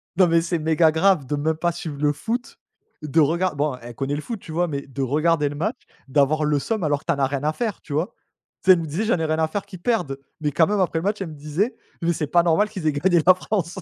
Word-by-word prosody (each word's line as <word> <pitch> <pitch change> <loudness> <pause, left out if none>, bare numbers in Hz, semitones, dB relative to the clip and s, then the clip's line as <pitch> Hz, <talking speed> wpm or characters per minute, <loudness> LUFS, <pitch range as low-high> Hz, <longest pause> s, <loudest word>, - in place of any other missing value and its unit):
Non 185 0 +5
mais 165 0 +3
c'est 170 +1 -1
méga 160 +1 +3
grave 160 -2 +3
de 145 - -2
même 155 +2 0
pas 170 +2 0
suivre 160 -3 -6
le 150 -1 +3
foot, 230 - -4 0.5
de 155 +2 +1
regar 165 +3 +2
bon, 145 -2 -1
elle 120 +1 -9
connaît 135 +4 -2
le 150 - -3
foot 230 +5 -5
tu 165 - -11
vois, 175 +3 +1
mais 140 -3 -3
de 135 0 -5
regarder 150 +3 +2
le 145 - -7
match, 205 - -2 0.3
d'avoir 145 +3 +2
le 150 -1 +2
seum 220 +6 -2
alors 145 -2 0
que - - -28
tu - - +2
n'en 140 - +1
as - - +3
rien 140 0 -3
à 155 +1 +1
faire, 220 0 -3
tu 145 - -8
vois? 155 +5 -1 0.5
Tu 190 - +7
sais - - +11
elle 180 - +1
me 165 - -3
disait: 160 +8 -2
«J'en 215 -6 +1
ai 160 - 0
rien 155 0 0
à 160 - +2
faire 200 +5 -4
qu'ils 185 -4 -11
perdent» 175 - -1 0.2
mais 150 -1 0
quand 160 +3 +4
même 210 -1 0
après 170 -3 +1
match 205 +3 -1
elle 190 - -3
me 155 - -9
disait: 155 - -2 0.3
«Mais 170 0 +1
c'est 155 -2 -2
pas 170 +4 +4
normal 175 +5 +2
qu'ils 190 -7 -4
aient - - +4
gagné 170 +4 +2
la 185 +1 +8
France.». 185 -2 -3
160 Hz, 290 wpm, -23 LUFS, 145-185 Hz, 0.5 s, sais